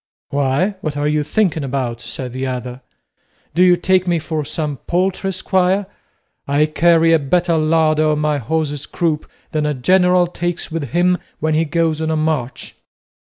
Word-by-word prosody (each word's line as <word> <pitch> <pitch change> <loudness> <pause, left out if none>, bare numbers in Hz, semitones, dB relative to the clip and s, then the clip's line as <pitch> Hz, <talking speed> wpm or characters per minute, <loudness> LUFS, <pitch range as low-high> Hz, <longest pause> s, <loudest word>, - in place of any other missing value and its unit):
"Why, 145 +8 0
what 150 -2 -3
are 145 0 0
you 150 0 +1
thinking 165 -2 0
about?" 125 -3 -3
said 125 0 -6
the 130 +1 -3
other; 125 0 -5 0.7
"do 170 - +1
you 180 -1 +6
take 185 +1 +2
me 175 -1 +2
for 160 -1 -3
some 150 -1 -3
paltry 190 +2 0
squire? 190 +1 +1 0.6
I 145 +2 +3
carry 165 +2 +3
a 165 - +5
better 170 +4 +1
larder 155 0 +2
on 150 - +1
my 150 -1 0
horse's 145 +2 -2
croup 160 -3 -2 0.2
than 150 -1 0
a 150 - -1
general 180 +6 +3
takes 175 -1 -4
with 160 -2 -2
him 180 +3 +2 0.2
when 155 0 0
he 160 +1 +2
goes 160 0 0
on 160 - -1
a 160 - 0
march." 155 -5 -2
155 Hz, 170 wpm, -18 LUFS, 145-175 Hz, 0.7 s, you